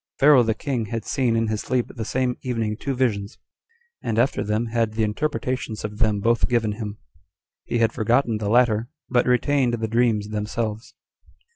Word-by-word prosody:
Pharaoh 140 -2 +7
the 110 -2 +1
king 125 -4 -2
had 115 0 -4
seen 125 -5 +1
in 115 0 +2
his 110 -1 -2
sleep 125 -2 0
the 115 - -4
same 125 +1 0
evening 115 -4 -2
two 135 +4 -3
visions; 110 -4 -1 0.6
and 110 - -2
after 120 -2 +2
them 105 +2 0
had 115 -1 0
the 110 0 0
interpretations 115 -1 -2
of 105 0 -6
them 105 -3 +2
both 115 +4 +2
given 115 -3 +1
him. 105 -1 -6 0.7
He 120 - -1
had 115 -1 +2
forgotten 115 0 +1
the 105 -1 -2
latter, 115 -1 +3 0.2
but 120 -1 +2
retained 125 0 +2
the 110 -1 -2
dreams 110 -2 +1
themselves. 110 +1 -3
115 Hz, 175 wpm, -23 LUFS, 110-125 Hz, 0.7 s, Pharaoh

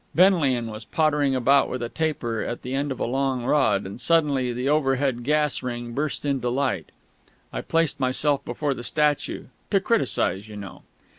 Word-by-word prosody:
Benlian 145 - +3
was 110 +1 -7
pottering 145 -1 +1
about 135 +2 +4
with 125 -1 -3
a - - -1
taper 120 -6 -2
at 120 - -4
the 125 - -4
end 140 +1 -1
of 130 - -4
a - - 0
long 130 0 -1
rod; 125 -9 +2
and 100 +6 -8
suddenly 145 -7 +2
the 125 +2 -3
overhead 135 -4 +1
gas 150 +1 +1
ring 120 -1 -5
burst 150 +2 -2
into 135 -4 0
light. 125 - -1 0.6
I - - -3
placed 165 -3 0
myself 140 +2 +1
before 140 +4 -2
the 120 - -8
statue 150 +2 0 0.3
to - - +3
criticise, 100 +3 0
you 105 - -9
know. 100 -2 -9
135 Hz, 175 wpm, -24 LUFS, 120-150 Hz, 0.6 s, about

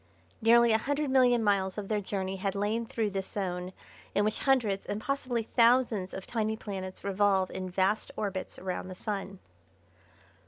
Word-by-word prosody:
Nearly 235 +1 +6
a 220 - +4
hundred 285 +3 -1
million 250 -3 +4
miles 195 -2 +1
of 205 -2 -4
their 210 0 0
journey 190 -1 -3
had 195 +1 -2
lain 215 +3 -1
through 220 -3 -1
this 195 -1 -3
zone 180 -2 -3 0.4
in 205 - +3
which 215 - 0
hundreds 230 -8 +1
and 205 - -2
possibly 255 -2 -1
thousands 230 -4 +3
of 190 - -7
tiny 220 -2 -1
planets 190 -3 -6
revolve 195 -1 +2
in 185 0 -4
vast 190 +3 +1
orbits 195 -3 -3
round 185 0 -4
the 185 - -7
Sun. 195 -1 -4
205 Hz, 165 wpm, -30 LUFS, 190-230 Hz, 0.4 s, Nearly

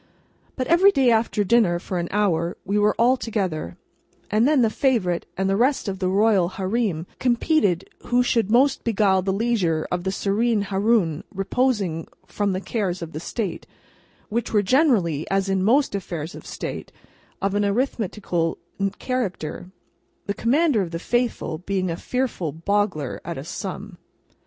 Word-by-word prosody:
But 255 - -2
every 355 +6 +5
day 265 -7 +3
after 220 -2 +2
dinner, 200 -4 +3
for 180 +1 -4
an 170 - -2
hour, 175 -5 0
we 205 +2 +1
were 210 0 +3
all 250 +3 +4
together, 185 - -3 0.5
and 220 +4 +3
then 290 -4 +4
the 220 - +2
Favourite 215 -10 0
and 190 0 0
the 195 - +2
rest 255 +3 +1
of 190 -1 -3
the 185 -1 0
Royal 195 -2 +3
Hareem 190 -3 -1
competed 240 - +2 0.2
who 245 +1 +3
should 230 -4 +1
most 260 +5 +3
beguile 200 -4 +2
the 190 +1 -1
leisure 195 -7 0
of 180 0 -1
the 190 - -1
Serene 210 +2 +1
Haroun 195 -5 +1
reposing 195 -4 0 0.2
from 205 -2 -1
the 185 - -2
cares 190 -6 -2
of 160 -1 -7
State—which 225 +3 -6
were 210 -2 +3
generally, 200 - +2
as 195 0 +1
in 190 -1 +1
most 260 +6 +3
affairs 170 -5 -4
of - - -11
State, - - -6 0.5
of 195 0 -1
an 205 0 +1
arithmetical 200 -6 -1 0.4
character, 185 - -3 0.6
the 200 - -1
Commander 270 +2 +2
of 180 - -3
the 165 - -4
Faithful 240 -5 -1
being 185 -1 -2
a - - -2
fearful 240 - -2
boggler 170 -3 -1
at 170 - -5
a 135 - -5
sum. 190 +2 -6
200 Hz, 155 wpm, -23 LUFS, 180-235 Hz, 0.6 s, every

